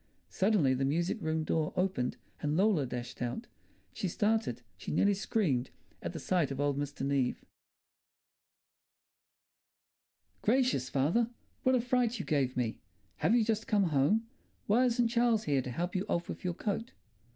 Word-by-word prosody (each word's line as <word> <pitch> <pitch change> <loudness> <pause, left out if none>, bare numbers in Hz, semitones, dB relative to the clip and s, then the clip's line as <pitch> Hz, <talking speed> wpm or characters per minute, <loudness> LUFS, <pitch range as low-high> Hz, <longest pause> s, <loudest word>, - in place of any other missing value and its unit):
Suddenly 190 -9 +3
the 130 +1 0
music 170 - 0
room 160 -1 0
door 155 0 0
opened 180 -9 0 0.2
and 150 +1 0
Lola 190 -8 +3
dashed 120 0 -6
out. 125 - -3 0.5
She 195 - -2
started, 205 - 0
she 95 - -8
nearly 200 +6 +3
screamed, 175 - 0 0.3
at - - -3
the - - -6
sight 175 -6 +1
of 135 -1 -5
old 145 -1 +1
Mr. 145 -1 -3
Neave. 135 -3 0 3.0
"Gracious, 245 - +2
father! 165 - +2 0.3
What 260 0 +3
a 250 - +3
fright 245 -1 +1
you 190 - -4
gave 135 -5 0
me! 120 -3 -1 0.4
Have 230 - +3
you 235 - +4
just 220 0 -1
come 200 -5 +3
home? 175 +12 +3 0.4
Why 235 +5 +4
isn't 240 -1 +2
Charles 235 -2 +2
here 140 -8 +1
to 130 - -6
help 170 +9 -2
you 185 - +1
off 170 - 0
with - - -6
your 180 -2 -1
coat?" 225 +5 -3
175 Hz, 160 wpm, -32 LUFS, 140-220 Hz, 3.0 s, you